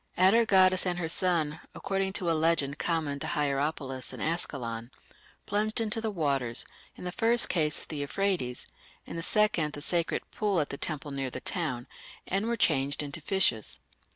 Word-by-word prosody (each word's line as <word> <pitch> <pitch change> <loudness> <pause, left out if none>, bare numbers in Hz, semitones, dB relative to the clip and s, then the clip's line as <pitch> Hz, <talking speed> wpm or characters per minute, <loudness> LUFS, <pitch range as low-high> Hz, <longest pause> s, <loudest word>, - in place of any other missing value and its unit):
Atargatis 190 -2 +5
and 175 -1 0
her 175 -2 -2
son, 160 -3 +1 0.2
according 195 0 -1
to 180 -4 -1
a - - +3
legend 155 -3 +1
common 155 -4 -1
to - - -3
Hierapolis 140 -3 -1
and - - -8
Ascalon, 120 -8 -2 0.6
plunged 215 +2 +1
into 225 0 0
the 220 - -1
waters 140 - -1 0.3
in - - -10
the 180 - -3
first 230 +5 +4
case 155 -4 +1
the 155 - -6
Euphrates, 145 -4 -1 0.4
in - - -7
the 165 - -3
second 170 -6 +2
the 145 - -6
sacred 170 0 0
pool 205 -4 0
at 150 - -1
the - - -4
temple 150 -2 -4
near 135 -1 -2
the 130 - -5
town 130 -7 -2 0.4
and 195 +4 -1
were 235 0 0
changed 140 -6 +2
into 145 +3 -4
fishes". 145 - +1
165 Hz, 170 wpm, -29 LUFS, 140-190 Hz, 0.6 s, Atargatis